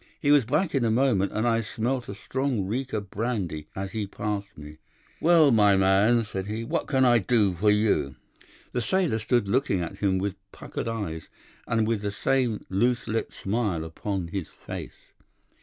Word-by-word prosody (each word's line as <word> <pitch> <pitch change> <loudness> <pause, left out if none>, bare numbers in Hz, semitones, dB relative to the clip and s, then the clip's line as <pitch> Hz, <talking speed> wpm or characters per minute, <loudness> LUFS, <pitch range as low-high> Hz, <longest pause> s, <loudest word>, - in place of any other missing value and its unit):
He 145 - +2
was 145 -5 +5
back 155 - 0
in 135 -3 +1
a 115 - +2
moment, 110 -5 +2
and 110 +2 0
I 115 -1 +2
smelt 120 +2 -2
a 100 - -5
strong 125 +1 -2
reek 125 +7 -3
of 105 -3 -4
brandy 100 -9 -3
as 95 0 -4
he 105 -1 -3
passed 105 0 -4
me. 75 +1 -11 0.4
"'Well, 160 -3 +5
my 105 -3 +5
man,' 100 +5 +4
said 95 -2 -5
he, 110 +2 -3
'what 115 - -2
can 130 -2 +3
I 120 -1 +5
do 105 -2 +2
for 100 +5 +1
you?' 105 -10 +2 0.6
"The 125 - -1
sailor 160 - +1
stood 110 -1 +1
looking 125 -2 +1
at 85 - -5
him 95 -2 +1
with 100 +1 -1 0.2
puckered - - -6
eyes, 100 -9 -4 0.4
and 115 -1 +1
with 115 -2 0
the 105 - -2
same 120 +1 0
loose 120 +5 0
lipped 115 +1 -2
smile 100 -5 -1
upon 90 +2 -4
his 95 -2 -4
face. - - -10
110 Hz, 185 wpm, -26 LUFS, 95-120 Hz, 0.6 s, was